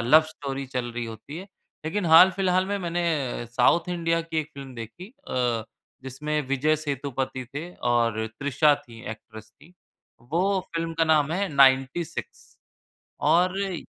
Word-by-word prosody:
love 130 +7 +7
story 140 -3 -5
चल 125 -2 -3
रही 120 0 -3
होती 115 +7 -9
है 195 +2 -10 0.4
लेकिन 180 +4 -1
हाल-फिलहाल 185 +2 +6
में 200 0 -1
मैंने 165 -9 -1
साउथ 130 +8 +3
इंडिया 165 -1 0
की 165 -1 -3
एक 155 - -9
फ़िल्म 135 -2 -9
देखी 115 - -8 0.2
अ, 120 -3 0 0.4
जिसमें 150 +4 -2
विजय 145 +3 +2
सेतुपति 135 -3 -3
थे 165 +5 -5 0.2
और 115 -2 +1
तृषा 145 +2 +4
थीं 115 -3 -13
एक्ट्रेस 110 0 -11
थीं, 150 +10 -21 0.5
वो 180 +10 0
फ़िल्म 165 0 -2
का 165 0 +2
नाम 155 -1 +3
है 195 +2 0
नाइन्टी 135 +2 +4
सिक्स - - -9 0.7
और 180 +2 +3
जी, 190 -4 -3
150 Hz, 150 wpm, -25 LUFS, 125-170 Hz, 0.7 s, love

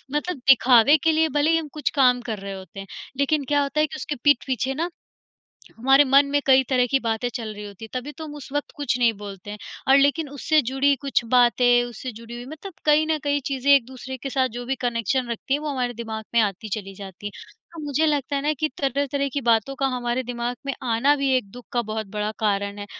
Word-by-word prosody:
मतलब 305 +2 -1
दिखावे 260 +2 +6
के 325 - +4
लिए 320 +1 +3
भले 300 +3 +3
ही 330 - +4
हम 320 - -3
कुछ 300 - -1
काम 250 -2 +4
कर 215 -2 -3
रहे 195 0 -6
होते 190 0 -10
हैं, 195 - -8 0.3
लेकिन 280 +1 +1
क्या 290 +1 +2
होता 280 +2 -2
है 305 - +3
कि 315 - -9
उसके 295 - -4
पीठ 290 -4 +4
पीछे 260 +1 -1
ना, 330 +5 -2 0.9
हमारे 270 +5 +5
मन 275 +1 +5
में 290 - +2
कई 265 0 +6
तरह 250 -2 +3
की 270 +2 +2
बातें 230 0 -1
चल 225 -3 -4
रही 210 0 -8
होती 205 +2 -10
हैं। 220 - -11
तभी 290 +4 -8
तो 320 +1 -9
हम 295 -1 -8
उस 285 - -10
वक़्त 290 0 -2
कुछ 260 -4 -1
नहीं 235 -2 +4
बोलते 200 -1 -9
हैं, 210 - -7 0.3
और 270 - +7
लेकिन 285 +2 +2
उससे 295 +3 +1
जुड़ी 280 +1 +3
कुछ 270 -3 +1
बातें, 245 0 +5
उससे 245 +1 -7
जुड़ी 230 +2 -10
हुई, 240 0 -7
मतलब 315 +6 -9
कहीं 300 +1 +4
न 310 - +2
कहीं, 285 0 +1
चीज़ें 275 0 0
एक 270 -4 +4
दूसरे 260 0 -8
के 270 +1 -6
साथ 260 -1 +1
जो 245 - -5
भी 270 - 0
कनेक्शन 240 +2 -1
रखती 235 +4 -2
हैं, 290 - -1
वो 305 - -4
हमारे 250 -3 -2
दिमाग 220 -1 -6
में 235 - +5
आती 210 0 -1
चली 195 -1 -9
जाती 195 0 -9
हैं। 205 - -8 0.3
तो 325 - -7
मुझे 295 +2 +1
लगता 285 -1 0
है 275 - -1
ना 300 +1 +1
कि 310 +1 -1
तरह-तरह 280 +1 0
की 285 - -1
बातों 235 +2 +2
का 270 0 0
हमारे 240 +1 -1
दिमाग 245 0 -4
में 275 - -1
आना 250 +5 +2
भी 275 -1 0
एक 205 -6 -3
दुख 245 +3 -12
का 240 -1 +1
बहुत 220 -1 -3
बड़ा 210 +1 -3
कारण 200 -1 -1
है। 205 - -6
260 Hz, 250 wpm, -23 LUFS, 230-285 Hz, 0.9 s, और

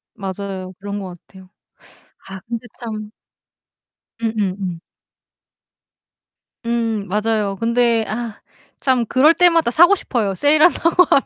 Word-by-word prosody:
맞아요. 190 -1 -6
그런 205 +1 -5
것 180 -2 -8
같아요. 190 -1 -16 0.8
아 190 -1 -7
근데 235 +1 -5
참 215 -3 -6 1.1
음음음. 195 -6 -2 1.9
음. 225 -4 -1
맞아요. 210 0 -1
근데 235 -1 +2
아 225 0 -5 0.4
참 250 -4 +1
그럴 290 +5 +5
때마다 335 -7 +3
사고 345 +8 +6
싶어요 215 - -2
세일한다고 320 - +4
하면. - - +5
225 Hz, 220 characters per minute, -19 LUFS, 195-245 Hz, 1.9 s, 사고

